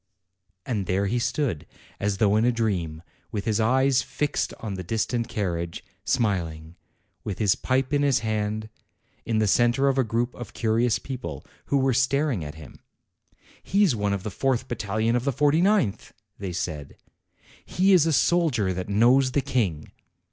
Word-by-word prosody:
And 105 -6 -2
there 95 +2 +1
he 120 +5 0
stood, 120 - -1 0.3
as 100 -1 -1
though 105 0 +3
in 110 - +3
a 125 - +4
dream, 90 -9 -2 0.3
with 100 -2 -3
his 110 -1 +1
eyes 130 +3 +3
fixed 145 +1 -2
on 110 -3 -5
the 95 - -5
distant 115 +4 -1
carriage, 85 -7 -3 0.2
smiling, 85 -9 -1 0.5
with 100 -4 -4
his 105 -4 +3
pipe 130 +2 -1
in 145 - +3
his 140 -3 +3
hand, 110 0 -2 0.6
in 115 - +1
the 110 - +3
centre 120 +6 +3
of 135 -1 +2
a - - +4
group 120 +2 -1
of 120 -4 -9
curious 115 +1 +1
people, 120 - -7 0.2
who 140 - +1
were 135 -1 +2
staring 135 - +1
at 75 +1 -7
him. 80 -4 -13 0.8
"He's 195 - +2
one 105 -1 -1
of 100 -2 -2
the 110 - -4
fourth 130 +4 0
battalion 110 +2 -1
of 125 - 0
the 140 - +1
forty 145 +5 +2
ninth!" 190 - +1 0.3
they 95 -2 -4
said. 80 -4 -5 0.7
"He 190 +2 +2
is 165 -3 +5
a - - +2
soldier 140 - +2
that 90 +2 -5
knows 125 +5 +4
the 140 - +2
King." 105 - -2
115 Hz, 170 wpm, -25 LUFS, 100-130 Hz, 0.8 s, is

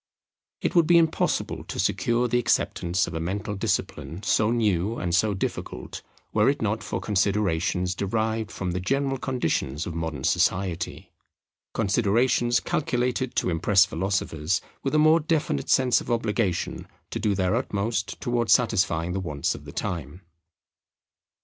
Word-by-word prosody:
It - - -1
would 170 -4 +4
be 175 0 +6
impossible 160 -1 +1
to - - -6
secure 120 +1 +1
the 120 +1 +2
acceptance 90 -6 +1
of - - -7
a 80 - -2
mental 100 +5 -3
discipline, 80 -3 -2
so 105 +2 +2
new 110 -2 +1
and 85 -2 -2
so 100 +4 +2
difficult, 95 - -5 0.3
were - - +4
it - - 0
not - - -1
for - - -3
considerations 95 -3 0
derived 110 +2 -1
from 90 -2 -4
the 90 - -2
general 135 +6 0
conditions 80 - -1
of 85 - -5
modern 80 -4 -4
society; 90 +2 0 0.6
considerations 115 +3 +2
calculated 130 -5 -1
to 90 - +1
impress 95 +4 +4
philosophers 95 -2 -1 0.2
with 135 +2 -1
a - - +5
more 155 +2 +6
definite 150 - -1
sense 130 -2 +4
of - - -9
obligation 110 -5 -1 0.2
to - - -3
do 105 -1 +1
their 95 -1 +1
utmost 105 +1 -2
towards 120 -5 0
satisfying 100 -9 +2
the 95 - -1
wants 75 -7 -2
of - - -10
the - - -8
time. 85 -1 -4
100 Hz, 150 wpm, -25 LUFS, 90-120 Hz, 0.6 s, be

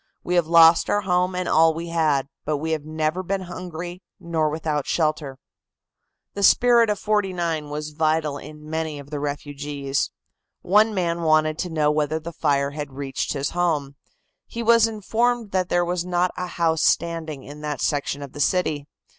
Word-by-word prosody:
"We 180 - -2
have 175 -3 +3
lost 165 0 +6
our 205 - +2
home 180 -1 +1
and 180 -1 -2
all 160 0 +4
we 170 +1 -5
had, 155 -5 +1 0.2
but 150 0 -1
we 160 +3 -3
have 155 -2 -1
never 155 +3 -2
been 190 +1 -2
hungry 175 0 -7 0.2
nor 165 -3 0
without 150 -2 -2
shelter." 155 -4 -1 1.0
The 200 - -5
spirit 235 +2 +5
of 210 - 0
'49 180 -7 -1
was 150 +1 -5
vital 155 -1 0
in 150 +1 -11
many 160 -1 -3
of 140 0 -11
the 150 - -3
refugees. 145 -1 -3 0.5
One 210 +3 +4
man 170 -2 -1
wanted 155 -1 +2
to 180 - -2
know 155 -2 +2
whether 150 +1 0
the 170 +2 -8
fire 140 -3 +1
had 145 -2 -6
reached 135 0 -3
his 140 -1 -2
home. 155 -6 -1 0.5
He 235 - -5
was 230 0 +5
informed 225 +1 -1
that 185 -1 0
there 175 0 +2
was 175 0 -1
not 180 0 0
a 180 0 -4
house 165 -2 0
standing 160 -5 0
in 145 +1 -10
that 150 -3 -3
section 145 -1 -1
of 140 - -9
the 145 - -9
city. 150 -2 0
160 Hz, 180 wpm, -23 LUFS, 150-180 Hz, 1.0 s, lost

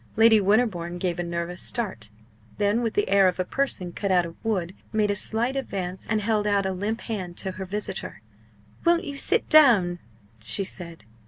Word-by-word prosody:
Lady 225 -1 +6
Winterbourne 195 -5 +1
gave 175 -1 -2
a - - 0
nervous 170 +1 -4
start; 190 - -4 0.5
then, 205 +3 +1
with 230 -2 -2
the 205 - +1
air 195 -1 +5
of 180 0 -1
a 185 - 0
person 190 -8 -2
cut 200 +2 -2
out 180 -2 +3
of 165 - -11
wood, 190 -6 -1 0.2
made 210 -1 +1
a - - -1
slight 235 +6 -1
advance, 190 -8 -4
and 215 -1 +1
held 210 0 0
out 200 -1 +2
a 190 - 0
limp 205 +5 -3
hand 185 -6 -5
to 190 - -2
her 190 +1 -6
visitor. 190 - -5 0.6
"Won't 340 0 +3
you 285 -2 -6
sit - - +2
down?" 220 - +6 0.4
she 115 - +1
said. 170 - -7
200 Hz, 190 wpm, -25 LUFS, 180-220 Hz, 0.6 s, Lady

